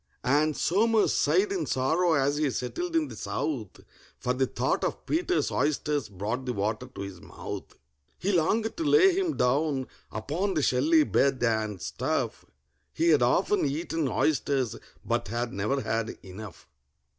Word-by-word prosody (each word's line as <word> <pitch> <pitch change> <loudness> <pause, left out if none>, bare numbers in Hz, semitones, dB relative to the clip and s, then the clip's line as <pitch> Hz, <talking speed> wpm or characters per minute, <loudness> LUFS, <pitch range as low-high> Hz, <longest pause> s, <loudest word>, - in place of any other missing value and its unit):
And 150 +3 +2
SOMERS 220 +4 +3
sighed 395 +1 +2
in 385 -3 -1
sorrow 160 +7 +2
as 140 0 +2
he 150 -1 +1
settled 330 - -3
in 320 -2 +2
the - - -9
south, 120 -11 -4 0.4
For 125 - -1
the 130 +1 +1
thought - - -1
of - - -3
PETER'S 360 +3 0
oysters 145 -1 0
brought 110 +7 -4
the 125 - 0
water 110 +4 -2
to - - -6
his 100 -2 -7
mouth. - - -8 0.4
He 195 - -1
longed 210 +6 +1
to 335 - -1
lay 380 +3 +5
him 370 -4 0
down 135 +1 +1 0.3
upon 165 - -2
the 155 - +1
shelly 150 +6 +4
bed, 135 -3 +1
and 110 -4 0
stuff: 85 - -2 0.5
He 170 +1 +1
had 150 -5 +5
often 180 +12 +2
eaten 155 +1 -1
oysters, 135 -4 +1 0.3
but - - -1
had 120 +3 -3
never 105 +8 0
had 115 -1 -2
enough. 100 +2 -10
140 Hz, 155 wpm, -28 LUFS, 120-175 Hz, 0.5 s, lay